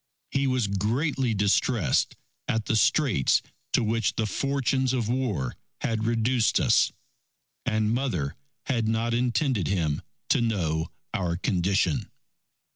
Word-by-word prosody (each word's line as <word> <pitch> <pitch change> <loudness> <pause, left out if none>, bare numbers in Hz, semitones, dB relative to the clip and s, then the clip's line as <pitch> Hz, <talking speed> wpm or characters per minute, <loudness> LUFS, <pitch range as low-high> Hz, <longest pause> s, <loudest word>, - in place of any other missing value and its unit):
He 135 0 +1
was 130 -3 +1
greatly 115 - 0
distressed 100 - +2 0.3
at 110 -1 0
the - - 0
straits 125 - +3 0.3
to - - +3
which 115 -2 0
the 110 - 0
fortunes 135 +2 0
of 120 -4 0
war 115 - -1 0.3
had 110 -1 -1
reduced 115 +1 +2
us. 120 -4 +4 0.8
And 110 -2 +1
Mother 115 - -1 0.3
had 115 -5 0
not 115 +1 0
intended 120 - +1
him 80 -7 0 0.3
to - - +3
know 85 -8 0 0.2
our 85 -3 -1
condition. 90 -2 +1
115 Hz, 120 wpm, -26 LUFS, 100-125 Hz, 0.8 s, us